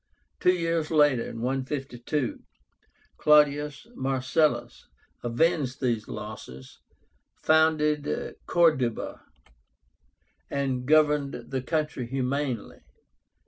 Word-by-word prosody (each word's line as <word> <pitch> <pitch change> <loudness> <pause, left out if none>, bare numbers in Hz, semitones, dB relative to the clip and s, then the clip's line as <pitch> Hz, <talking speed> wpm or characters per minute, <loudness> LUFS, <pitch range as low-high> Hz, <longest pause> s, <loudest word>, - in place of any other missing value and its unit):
Two 180 0 +4
years 165 -2 -1
later 145 -6 +3
(152), 130 +2 -3 0.8
CLAUDIUS 150 0 +3
MARCELLUS 130 - 0 0.4
avenged 135 +2 +1
these 115 -4 -1
losses, 105 - -9 0.6
founded 155 -2 +1
Corduba, 155 -9 +1 1.3
and 130 -3 -2
governed 150 -4 +2
the 130 -1 -1
country 150 -3 -2
humanely. 130 -1 -2
140 Hz, 70 wpm, -27 LUFS, 125-150 Hz, 1.3 s, Two